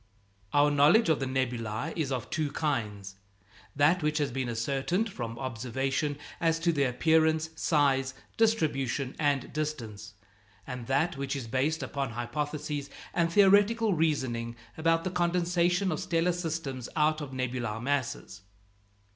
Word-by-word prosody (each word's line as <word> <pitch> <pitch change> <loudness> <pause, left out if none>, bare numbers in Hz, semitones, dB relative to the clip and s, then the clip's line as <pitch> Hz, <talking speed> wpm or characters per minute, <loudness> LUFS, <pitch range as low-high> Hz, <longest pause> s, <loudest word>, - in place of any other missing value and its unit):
Our 145 0 +4
knowledge 150 +9 +5
of 160 - +3
the 135 - -2
nebulæ 125 +1 -2
is 150 -5 -1
of 125 -3 -2
two 155 -2 -1
kinds 105 -10 -2 0.6
that 150 +6 +4
which 150 0 0
has 145 -2 0
been 130 -1 -2
ascertained 140 - -1
from 115 -7 -5
observation 130 +4 -2 0.2
as 165 -1 +2
to 170 0 +3
their 140 -3 +2
appearance, 160 +4 +2
size, 135 -4 +2 0.2
distribution, 145 - +1
and 145 -4 0
distance; 110 -9 -4 0.5
and 125 -2 -6
that 150 +4 +1
which 140 0 -2
is 135 -4 -4
based 135 +6 0
upon 135 -2 -3
hypotheses 145 +4 -3 0.2
and 170 -1 +1
theoretical 205 +3 +5
reasoning 130 -8 0 0.2
about 165 +1 +2
the 185 - -2
condensation 175 +1 +1
of 155 - -2
stellar 175 -1 +1
systems 160 -7 -4
out 155 0 +2
of 145 -3 -6
nebular 125 -4 -3
masses. 125 -6 -2
145 Hz, 140 wpm, -29 LUFS, 130-165 Hz, 0.6 s, knowledge